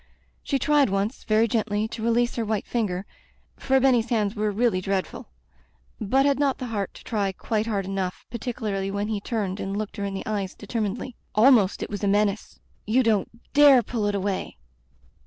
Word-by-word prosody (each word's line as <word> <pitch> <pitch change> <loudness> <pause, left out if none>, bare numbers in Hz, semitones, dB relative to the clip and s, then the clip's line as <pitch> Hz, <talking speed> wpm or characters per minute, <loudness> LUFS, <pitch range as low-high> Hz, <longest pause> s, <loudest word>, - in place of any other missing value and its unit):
She 275 - -1
tried 290 -1 +3
once, 200 +5 -2
very 220 +1 +3
gently, 215 -1 0
to 225 - -7
release 235 +1 +1
her 235 - -1
white 215 -2 -2
finger 200 -5 -2 0.3
— - - -36
^for 265 0 +2
Benny's 245 -3 +3
hands 215 -4 +1
were 210 0 0
really 210 -2 +1
dreadful 190 0 -3 0.4
— - - -36
^but 265 +6 +2
had 280 -1 +2
not 280 -2 +1
the 255 - -5
heart 200 -3 -3
to - - -13
try 205 -4 -1
quite^ 215 +3 -2
hard 200 -4 -1
enough, 190 -1 -3
particularly 215 -5 -3
when 200 +2 -2
he 210 -2 -2
turned 205 -4 -3
and 195 +1 -3
looked 215 +1 -5
her 200 - -3
in 200 -1 -3
the 195 - -5
eyes 200 -3 -3
determinedly. 220 +3 -4 0.2
Almpst 215 -3 +5
it - - -6
was 205 0 -5
a - - +2
menace. 205 +1 0 0.3
"You 250 +5 +3
don't 215 -5 +1 0.2
dare 280 -4 +7
pull 215 -1 -2
it 205 - 0
away!" 195 - -3
215 Hz, 195 wpm, -25 LUFS, 200-235 Hz, 0.4 s, dare